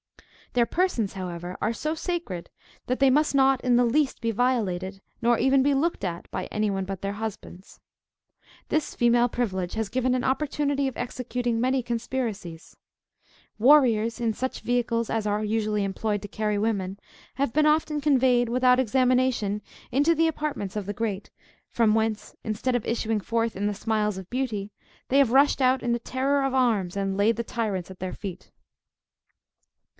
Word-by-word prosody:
Their 240 Hz, -1 st, +3 dB
persons, 285 Hz, -, 0 dB
however, 180 Hz, -1 st, -6 dB
are 215 Hz, -, +1 dB
so 305 Hz, +7 st, -2 dB
sacred, 325 Hz, -, -4 dB, 0.4 s
that 255 Hz, -, -1 dB
they 275 Hz, -1 st, +5 dB
must 300 Hz, +1 st, +2 dB
not 270 Hz, -1 st, +4 dB
in 250 Hz, -2 st, +3 dB
the 245 Hz, -, +4 dB
least 275 Hz, +4 st, +1 dB
be 230 Hz, -1 st, -1 dB
violated, 200 Hz, -6 st, -1 dB, 0.2 s
nor 240 Hz, 0 st, +3 dB
even 265 Hz, +1 st, +3 dB
be 280 Hz, 0 st, +3 dB
looked 320 Hz, -3 st, 0 dB
at, 175 Hz, -2 st, -4 dB
by -, -, -3 dB
any 215 Hz, 0 st, -1 dB
one 195 Hz, -1 st, -1 dB
but 195 Hz, -1 st, -6 dB
their 200 Hz, 0 st, -2 dB
husbands. 205 Hz, -3 st, -7 dB, 0.9 s
This 310 Hz, -, -1 dB
female 240 Hz, 0 st, +3 dB
privilege 190 Hz, -7 st, -2 dB
has 220 Hz, -1 st, -1 dB
given 255 Hz, +2 st, +1 dB
an 255 Hz, -, 0 dB
opportunity 280 Hz, 0 st, 0 dB
of 265 Hz, -, -5 dB
executing 245 Hz, -1 st, -2 dB
many 260 Hz, +1 st, +2 dB
conspiracies. 230 Hz, -8 st, -4 dB, 0.8 s
Warriors, 230 Hz, -4 st, +4 dB
in 230 Hz, -2 st, 0 dB
such 260 Hz, +4 st, -4 dB
vehicles 235 Hz, -1 st, 0 dB
as 225 Hz, -2 st, -1 dB
are 210 Hz, +1 st, 0 dB
usually 210 Hz, -1 st, 0 dB
employed 205 Hz, +1 st, -2 dB
to -, -, -5 dB
carry 210 Hz, 0 st, -1 dB
women, 200 Hz, -2 st, -1 dB, 0.4 s
have 270 Hz, -4 st, -1 dB
been 305 Hz, +1 st, +4 dB
often 300 Hz, -1 st, +1 dB
conveyed, 255 Hz, -4 st, +3 dB
without 250 Hz, +1 st, +4 dB
examination, 255 Hz, -4 st, +1 dB, 0.3 s
into 290 Hz, +6 st, +3 dB
the 325 Hz, +1 st, +3 dB
apartments 295 Hz, -10 st, -3 dB
of 205 Hz, -2 st, -3 dB
the 205 Hz, -, -2 dB
great; 205 Hz, -2 st, -3 dB, 0.4 s
from 225 Hz, -3 st, +2 dB
whence, 220 Hz, -1 st, -1 dB
instead 220 Hz, +4 st, -1 dB
of 240 Hz, -, -1 dB
issuing 225 Hz, -2 st, -1 dB
forth 230 Hz, +1 st, -1 dB
in 205 Hz, +2 st, -1 dB
the 210 Hz, -, -1 dB
smiles 210 Hz, -1 st, -1 dB
of 190 Hz, -1 st, -9 dB
beauty, 225 Hz, -6 st, -2 dB, 0.4 s
they 275 Hz, -, +4 dB
have 270 Hz, -5 st, +4 dB
rushed 275 Hz, +2 st, +4 dB
out 255 Hz, 0 st, +3 dB
in 240 Hz, -1 st, +1 dB
the 240 Hz, -, 0 dB
terror 275 Hz, +3 st, 0 dB
of 270 Hz, -1 st, 0 dB
arms, 210 Hz, -8 st, +1 dB
and 195 Hz, -1 st, -1 dB
laid 210 Hz, +4 st, +2 dB
the 235 Hz, -, -1 dB
tyrants 205 Hz, -7 st, -3 dB
at 185 Hz, -, -12 dB
their 185 Hz, 0 st, -4 dB
feet. 190 Hz, -4 st, -8 dB
235 Hz, 175 wpm, -26 LUFS, 205-260 Hz, 0.9 s, they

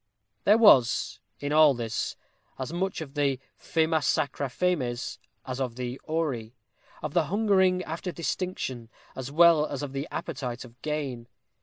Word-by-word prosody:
There 210 Hz, +2 st, +6 dB
was, 135 Hz, -, +5 dB, 0.2 s
in 145 Hz, +1 st, -2 dB
all 155 Hz, -3 st, +6 dB
this, 115 Hz, -2 st, -3 dB, 0.4 s
as 135 Hz, +4 st, -5 dB
much 185 Hz, 0 st, -2 dB
of 140 Hz, -3 st, -7 dB
the 140 Hz, -3 st, +1 dB, 0.2 s
"famæ 160 Hz, -1 st, +1 dB
sacra 140 Hz, -3 st, 0 dB
fames" 130 Hz, -6 st, -1 dB, 0.3 s
as 130 Hz, +1 st, -4 dB
of 125 Hz, -3 st, -2 dB
the 125 Hz, +1 st, -5 dB
"auri;" 135 Hz, -8 st, -2 dB, 0.5 s
of 155 Hz, -1 st, -3 dB
the 170 Hz, -3 st, +3 dB
hungering 190 Hz, 0 st, +3 dB
after 170 Hz, +3 st, -4 dB
distinction, 165 Hz, -9 st, -3 dB, 0.3 s
as 130 Hz, +1 st, -5 dB
well 160 Hz, -1 st, +6 dB
as 145 Hz, 0 st, -4 dB
of 140 Hz, -2 st, -5 dB
the 140 Hz, +2 st, -3 dB
appetite 125 Hz, -2 st, -5 dB
of 120 Hz, 0 st, -17 dB
gain. 140 Hz, -6 st, -3 dB
145 Hz, 150 wpm, -27 LUFS, 125-170 Hz, 0.5 s, There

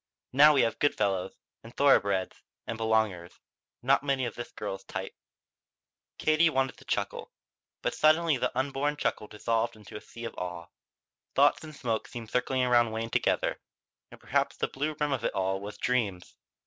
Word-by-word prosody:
Now 150 Hz, +3 st, +8 dB
we 135 Hz, -, +5 dB
have 115 Hz, -, -1 dB
good 145 Hz, -, +2 dB
fellows, 95 Hz, -3 st, 0 dB, 0.3 s
and 115 Hz, +1 st, -14 dB
thoroughbreds, 100 Hz, -9 st, +3 dB, 0.2 s
and 115 Hz, -, -4 dB
belongers. 110 Hz, -6 st, 0 dB, 0.4 s
Not 135 Hz, +2 st, +4 dB
many 135 Hz, -2 st, 0 dB
of 115 Hz, -, -4 dB
this 120 Hz, -, -7 dB
girl's 95 Hz, -2 st, -5 dB
type." -, -, -5 dB, 1.0 s
Katie 155 Hz, +2 st, +4 dB
wanted 135 Hz, -3 st, 0 dB
to -, -, -16 dB
chuckle. -, -, -3 dB, 0.5 s
But -, -, 0 dB
suddenly 155 Hz, 0 st, +4 dB
the -, -, 0 dB
unborn 140 Hz, +2 st, 0 dB
chuckle 105 Hz, -, -1 dB
dissolved 115 Hz, +2 st, -1 dB
into 105 Hz, -2 st, -13 dB
a 105 Hz, -, -6 dB
sea 115 Hz, 0 st, -9 dB
of 115 Hz, -, -5 dB
awe. 90 Hz, -1 st, -6 dB, 0.7 s
Thoughts -, -, +4 dB
and 155 Hz, -2 st, -9 dB
smoke 115 Hz, -5 st, -2 dB
seemed 115 Hz, -2 st, -8 dB
circling 125 Hz, +1 st, +1 dB
around 120 Hz, -2 st, +4 dB
Wayne 115 Hz, +1 st, -4 dB
together; -, -, +1 dB, 0.5 s
and -, -, -14 dB
perhaps -, -, 0 dB
the -, -, 0 dB
blue 150 Hz, +3 st, -2 dB
rim 150 Hz, -1 st, 0 dB
of 135 Hz, -, -1 dB
it -, -, -1 dB
all 95 Hz, 0 st, 0 dB
was 105 Hz, +1 st, -7 dB
dreams. 105 Hz, -8 st, -1 dB
120 Hz, 175 wpm, -29 LUFS, 105-140 Hz, 1.0 s, Now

